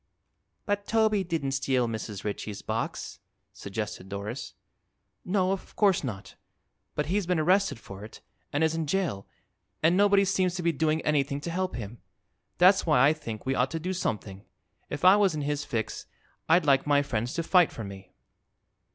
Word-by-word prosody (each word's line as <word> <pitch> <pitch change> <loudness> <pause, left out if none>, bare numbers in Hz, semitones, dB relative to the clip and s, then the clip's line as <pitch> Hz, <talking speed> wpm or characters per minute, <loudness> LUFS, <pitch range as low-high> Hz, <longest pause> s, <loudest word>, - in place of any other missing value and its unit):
"But 205 -1 -1
Toby 220 -3 +2
didn't 165 -6 -2
steal 130 -2 +1
Mrs. 110 -3 -5
Ritchie's 105 -1 -5
box," - - -4 0.3
suggested 100 -1 -6
Doris. 100 +1 -6 0.7
"No; 185 0 +1
of 195 - -5
course 200 -6 +3
not. 105 -7 -6 0.6
But 150 - 0
he's 185 +3 -1
been 180 -1 +1
arrested 190 - +2
for 100 -2 -10
it 110 - -11 0.3
and 145 +2 +1
is 160 0 +2
in 165 -2 -2
jail, 170 - -1 0.6
and 165 +3 +5
nobody 200 0 +4
seems 185 -2 +1
to 175 - -3
be 170 - +3
doing 160 +1 0
anything 140 -2 +1
to 170 - -4
help 185 +2 -2
him. 115 0 -7 0.6
That's 185 +2 +6
why 150 -5 +5
I 150 - +4
think 115 -8 -7
we 135 - +1
ought 130 0 +1
to 165 - -3
do 180 +4 -3
something. 105 - -3 0.5
If - - -3
I 190 +2 +8
was 195 -5 +3
in 150 - -2
his 145 0 -2
fix 110 -2 -4 0.4
I'd 165 0 +5
like 140 0 +3
my 145 -1 +4
friends 120 0 -2
to 165 - -1
fight 180 0 +4
for 115 - -7
me." 95 -2 -10
150 Hz, 175 wpm, -28 LUFS, 115-185 Hz, 0.7 s, I